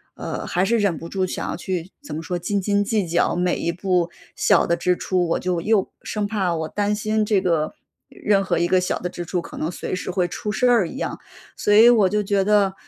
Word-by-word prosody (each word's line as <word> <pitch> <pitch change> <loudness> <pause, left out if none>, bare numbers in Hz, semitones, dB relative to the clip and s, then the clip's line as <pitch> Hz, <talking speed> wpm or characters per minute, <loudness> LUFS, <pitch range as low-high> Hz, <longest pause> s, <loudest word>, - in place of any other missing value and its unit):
呃， - - -5
还 180 +2 +1
是 230 +2 +2
忍 195 -6 +1
不 165 - -8
住 190 0 -1
想 - - -4
要 - - -3
去 180 +1 -4
怎 150 - -7
么 160 - -5
说， 180 0 -3
斤 200 +3 -1
斤 200 +1 +1
计 205 -3 0
较 170 - +1
每 180 0 +1
一 170 - -1
步 180 -1 0 0.3
小 - - +3
的 170 - +1
支 180 +1 +1
出， 180 -2 0
我 165 - 0
就 180 -2 -1
又 210 0 +1
生 210 -1 -3
怕 195 -5 -1
我 160 -1 -3
担 205 +2 -1
心 215 0 0
这 205 -2 +2
个 165 - 0 0.4
任 200 -2 +1
何 175 -3 0
一 175 - +2
个 185 0 +3
小 185 - -1
的 180 - -3
支 175 - -6
出 175 +1 -2
可 - - -11
能 160 +3 -2
随 185 - -4
时 185 - -4
会 180 -1 0
出 210 +4 -4
事 250 +3 +2
儿 230 -8 +4
一 - - -8
样。 - - -3 0.4
所 205 - +1
以 225 +3 +8
我 215 -6 +5
就 210 0 +1
觉 200 -1 +1
得， 200 -2 +3
185 Hz, 265 characters per minute, -22 LUFS, 175-205 Hz, 0.4 s, 以